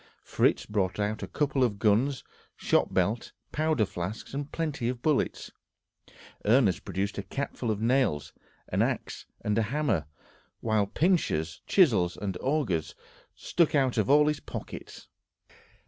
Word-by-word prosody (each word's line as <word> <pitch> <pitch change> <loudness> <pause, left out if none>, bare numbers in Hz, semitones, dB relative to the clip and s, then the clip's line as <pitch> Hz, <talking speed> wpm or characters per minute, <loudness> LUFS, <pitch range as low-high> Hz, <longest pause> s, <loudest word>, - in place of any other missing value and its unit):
Fritz - - +1
brought 100 -2 -1
out 105 +1 -1
a - - -4
couple 145 -3 0
of 110 -5 +1
guns, 115 +6 +2 0.3
shot - - +1
belt, 100 +5 0 0.2
powder 155 -7 +1
flasks, 95 +7 -6
and 140 +1 -4
plenty 150 -7 -2
of 125 0 -5
bullets. 150 -3 0 0.9
Ernest 105 -5 +3
produced 100 +1 -3
a - - 0
cap 135 +9 -4
full 120 - -3
of 105 -1 -1
nails, 120 - +1 0.4
an - - +1
axe - - -2
and 105 - 0
a 110 -1 0
hammer, 140 - 0 0.5
while 110 -3 +1
pinchers, 100 - 0
chisels, 110 - +4
and 100 -3 -3
augers 130 - 0 0.4
stuck 170 -3 +1
out 130 -4 +2
of 110 - +1
all 150 +1 +6
his 150 -1 0
pockets. - - -8
115 Hz, 145 wpm, -28 LUFS, 100-145 Hz, 0.9 s, all